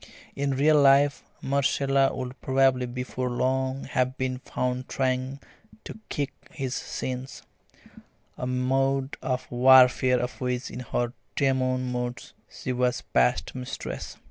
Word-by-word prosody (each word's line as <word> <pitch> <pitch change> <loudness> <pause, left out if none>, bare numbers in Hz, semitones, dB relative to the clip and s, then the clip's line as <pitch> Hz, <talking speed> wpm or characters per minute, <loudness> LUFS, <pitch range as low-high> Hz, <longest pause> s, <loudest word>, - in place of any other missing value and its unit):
In 140 -1 -1
real 150 +1 +5
life 140 +1 +5 0.2
Marcella 135 0 +2
would 130 0 -6
probably 130 -1 +2
before 125 +1 -3
long 130 +2 -1
have 130 +1 -1
been 130 -1 -2
found 125 0 -3
trying 130 0 -1 0.4
to - - -9
kick 145 -3 -2 0.2
his 130 -2 -4
shins 130 +1 -5 0.9
a 125 - -4
mode 135 +2 0
of 130 -1 -2
warfare 125 0 +6
of 125 +2 -4
which 125 0 -2
in 120 - -6
her 120 -1 -2 0.2
demon 130 -2 +1
moods 125 0 -4 0.2
she 130 - -4
was 125 0 0
past 60 -1 +2
mistress. 125 -1 -6
130 Hz, 125 wpm, -26 LUFS, 125-135 Hz, 0.9 s, warfare